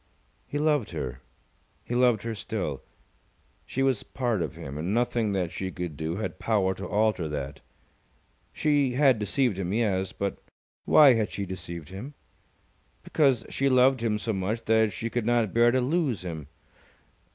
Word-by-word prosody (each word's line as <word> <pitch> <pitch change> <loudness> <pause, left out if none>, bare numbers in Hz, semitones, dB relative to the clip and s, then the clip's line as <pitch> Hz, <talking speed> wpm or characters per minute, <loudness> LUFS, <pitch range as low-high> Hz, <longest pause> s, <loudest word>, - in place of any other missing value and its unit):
He 145 - -3
loved 150 -5 +1
her. 65 0 -5 0.6
He - - -5
loved 120 -4 +3
her 115 0 -3
still. 100 - -4 0.9
She 135 - -1
was 135 -5 +2
part 120 -7 -2
of - - -3
him, 70 +2 -7
and 90 +7 -1
nothing 120 -2 +1
that 95 -4 -1
she 95 - -4
could 90 -4 -5
do 80 +3 -3
had 110 - -4
power 100 -4 +1
to - - -7
alter 105 -6 +1
that. 70 -1 -5 0.9
She 145 -4 +1
had 130 -3 +4
deceived 105 0 0
him, 90 -1 -2
yes. 100 -4 0
But 100 0 -3 0.5
why 145 -4 +7
had 110 -3 0
she 100 - -3
deceived 85 -4 -7
him? 120 +10 -8 0.9
Because 135 -7 +2
she 140 0 +1
loved 130 0 +4
him 110 -2 +1
so 105 +2 -2
much 105 +4 -2
that 110 -1 +3
she 115 +4 -4
could 120 -2 -1
not 120 -4 +2
bear 120 +1 +5
to 130 +2 +2
lose 135 - 0
him. 80 -5 -6
110 Hz, 165 wpm, -27 LUFS, 95-125 Hz, 0.9 s, why